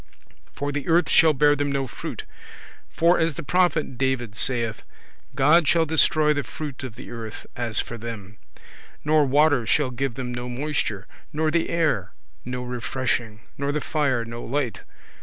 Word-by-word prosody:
For 145 0 -3
the 145 -1 -4
earth 170 +1 +4
shall 160 -1 +6
bear 145 +1 +4
them 145 0 -1
no 135 -1 0
fruit 125 - -6 0.7
(for, 170 +2 +3
as 160 -2 +1
the - - -5
prophet 155 -5 +1
David 130 -5 -1
saith, 115 -2 0 0.5
"God 150 +4 +5
shall 165 +1 +4
destroy 155 -1 +3
the 145 - -1
fruit 140 +1 -7
of 125 -4 -6
the 125 - -10
earth, 115 -2 -7
as 120 -2 -1
for 120 - -4
them"); 110 -3 -7 0.7
nor 150 -1 +4
water 145 -1 +4
shall 140 +1 +2
give 130 0 -2
them 125 -1 -4
no 120 0 -5
moisture, 125 -6 -2 0.3
nor 155 +1 0
the 170 +1 +1
air 150 - 0 0.3
no 125 0 -4
refreshing, 120 -2 -2 0.2
nor 140 0 0
the 150 - -1
fire 140 -7 0
no 115 +1 -7
light. 130 -2 -2
135 Hz, 165 wpm, -24 LUFS, 120-150 Hz, 0.7 s, shall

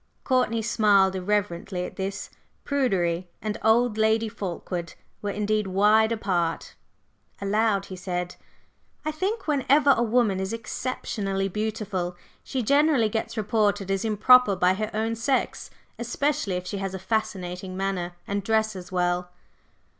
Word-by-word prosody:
Courtney 250 -4 +1
smiled 205 -4 +3
irreverently 185 -1 -1
at - - -9
this. 195 0 -4 0.3
Prudery 185 -11 0
and 215 -1 -4
"old" 220 0 +3
Lady 220 +1 +3
Fulkeward 180 -4 -5 0.3
were 205 - -2
indeed 210 0 0
wide 210 +4 +4
apart. 180 -7 -1 0.7
Aloud 200 0 +1
he 190 - -8
said: 180 -1 -4 0.7
"I 310 - 0
think 380 +8 -2
whenever 285 0 +4
a - - 0
woman 225 -4 +2
is 190 +2 -3
exceptionally 205 -4 -3
beautiful 205 -3 -3 0.3
she 260 -2 -2
generally 280 -2 +3
gets 225 +2 -3
reported 205 -2 +1
as 195 -1 0
'improper' 220 0 +5
by 180 0 +3
her 215 +2 -3
own 220 +1 -1
sex; 255 +4 -1 0.3
especially 245 -3 -1
if 180 0 -4
she 200 +2 -4
has 195 -1 -3
a - - -3
fascinating 185 -3 -3
manner 190 -2 -2
and 200 0 -2
dresses 215 -4 -1
well." 180 0 0
210 Hz, 135 wpm, -25 LUFS, 190-225 Hz, 0.7 s, improper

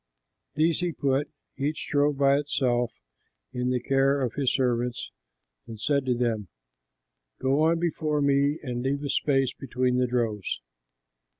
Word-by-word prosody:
These 160 +2 +2
he 175 -2 -1
put, 140 0 0 0.3
each 145 +3 -2
drove 145 0 +2
by 140 0 +4
itself, 125 -5 0 0.6
in 125 0 -1
the 125 0 +1
care 135 +2 +2
of 125 -4 -1
his 140 -3 +1
servants 125 -2 -1 0.6
and 110 -2 -8
said 140 +2 0
to 125 - +2
them, 115 -4 -1 0.9
"Go 135 +3 +2
on 165 +1 +3
before 160 -3 -1
me 140 +2 +2
and 120 -3 -3
leave 140 +3 -1
a 145 - -3
space 135 -3 +1
between 125 -1 -1
the 125 0 +2
droves." 115 - -1
135 Hz, 145 wpm, -27 LUFS, 125-145 Hz, 0.9 s, by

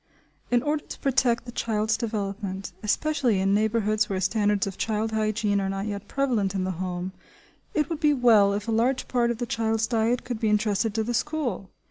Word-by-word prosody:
In 245 0 +2
order 295 0 0
to - - -7
protect 255 -3 +1
the 240 - -7
child's 220 -2 0
development, 200 -3 -4
especially 255 0 +1
in 195 +1 +2
neighbourhoods 215 0 +1
where 190 -2 -1
standards 205 +1 +1
of 195 -2 -5
child 220 +1 -1
hygiene 215 -2 0
are 195 - -1
not 195 +1 -3
yet 205 -1 -5
prevalent 230 -8 0
in 190 - 0
the 185 - -1
home, 180 +1 -4 0.6
it 300 -2 +2
would 325 -2 -4
be 300 -2 +4
well 230 -7 +5
if 205 +1 -3
a - - 0
large 240 +4 +1
part 240 -2 +1
of 235 - -1
the 240 - -2
child's 225 -1 0
diet 230 +1 +1
could 245 -3 -4
be 220 - +1
entrusted 210 0 +1
to 220 - +1
the 240 +2 -2
school. 275 -7 -2
220 Hz, 200 wpm, -26 LUFS, 200-240 Hz, 0.6 s, well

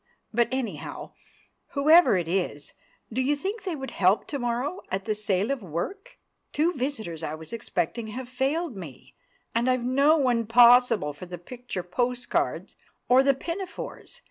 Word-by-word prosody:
But, 235 +1 +3
anyhow, 260 -3 -4 0.6
whoever 305 - +6
it 175 -2 -2
is, 170 -5 -2 0.4
do 255 - +1
you 280 +3 +2
think 390 +9 -4
they 365 -4 -2
would 270 -2 -6
help 190 +2 +3
to 285 - -3
morrow 245 +9 -2
at 190 0 -3
the 215 - 0
Sale 210 +1 0
of 275 -3 -2
Work? 185 - -5 0.3
Two 330 +4 +1
visitors 245 - -4
I 155 -1 -3
was 160 +3 -10
expecting 225 0 -2
have 250 +3 -6
failed 270 +3 -1
me, 165 -9 -10 0.4
and 235 +2 +1
I've 255 -1 +1
no 280 +5 +4
one 245 -6 +1
possible 235 -8 +6
for 165 +5 -10
the 175 0 -7
picture 235 +1 -6
post 240 +7 -2
cards - - -1 0.3
or 255 +1 +7
the 275 0 +3
pinafores. 380 - -6
245 Hz, 165 wpm, -26 LUFS, 195-275 Hz, 0.6 s, or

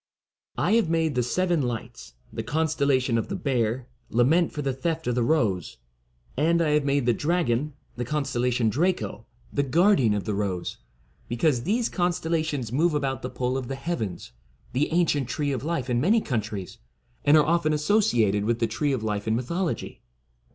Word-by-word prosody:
I - - +1
have 220 -8 +1
made 165 -2 +1
the 125 - +1
Seven 175 +6 +1
Lights, 120 - -5 0.2
the - - -3
constel 155 +3 0
lation 130 -4 +2
of - - -3
the 195 - -3
Bear, 125 - -1 0.2
lament 150 +9 +3
for 150 - -4
the 135 -1 0
theft 160 +5 -2
of 125 - 0
the 125 - +1
Rose, 110 - 0 0.6
and 165 +5 +2
I 165 -2 +2
have 150 -1 +3
made 140 -2 +1
the 120 - +4
Dragon, 150 -2 0 0.2
the 120 - -1
con 150 +4 -1
stellation 125 -3 0
Draco, 150 - -1 0.3
the - - +2
guardian 140 - +3
of 100 - -2
the 105 - -2
Rose, 100 -3 -2 0.5
be 120 - -4
cause 130 -2 +2
these 225 - +1
constellations 160 - -1
move 155 +5 +2
about 135 -2 -1
the 125 - -4
pole 125 0 -2
of 125 - -6
the 135 - -3
heavens, 135 - -4 0.4
the 140 +5 0
ancient 150 -6 +1
Tree 145 -1 -1
of 130 -1 -3
Life 160 -5 -2
in 120 -1 +1
many 210 - +4
countries, 110 - -4 0.4
and 145 +2 +6
are 150 - +5
often 170 -1 +2
associated 150 - +2
with 115 +2 +1
the 115 - +1
Tree 140 +6 -1
of 125 -4 -2
Life 105 -1 -2
in 110 - +2
mythology. 170 +9 -3
140 Hz, 185 wpm, -26 LUFS, 120-160 Hz, 0.6 s, and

